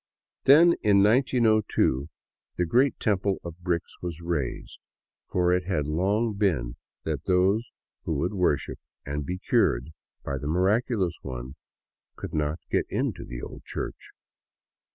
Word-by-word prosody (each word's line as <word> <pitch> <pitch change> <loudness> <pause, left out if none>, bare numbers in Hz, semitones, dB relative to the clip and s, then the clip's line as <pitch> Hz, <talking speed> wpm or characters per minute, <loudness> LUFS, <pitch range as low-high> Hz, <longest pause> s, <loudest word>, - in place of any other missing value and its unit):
Then, 165 +5 +8
in 100 -2 +5
1902, 110 - +2 0.5
the 90 - +1
great 125 +11 +2
temple 100 -2 +1
of 85 0 -8
bricks 85 -2 -3
was 85 -2 -5
raised, 85 -7 -3 0.5
for 90 -1 +2
it 90 0 0
had 90 -7 0
long 100 +9 +1
been 80 - 0 0.3
that - - -3
those 95 +5 +2 0.4
who 80 - -1
would 85 +8 -1
worship 90 -7 0 0.3
and 70 0 -4
be 90 - -2
cured 65 -6 +1 0.3
by 70 -1 -2
the 70 - -5
Miraculous 95 - +1
One 65 -1 -6 0.6
could - - -7
not 75 0 0
get - - +1
into - - -2
the - - -8
old - - -8
church. - - -6
90 Hz, 135 wpm, -26 LUFS, 75-105 Hz, 0.6 s, Then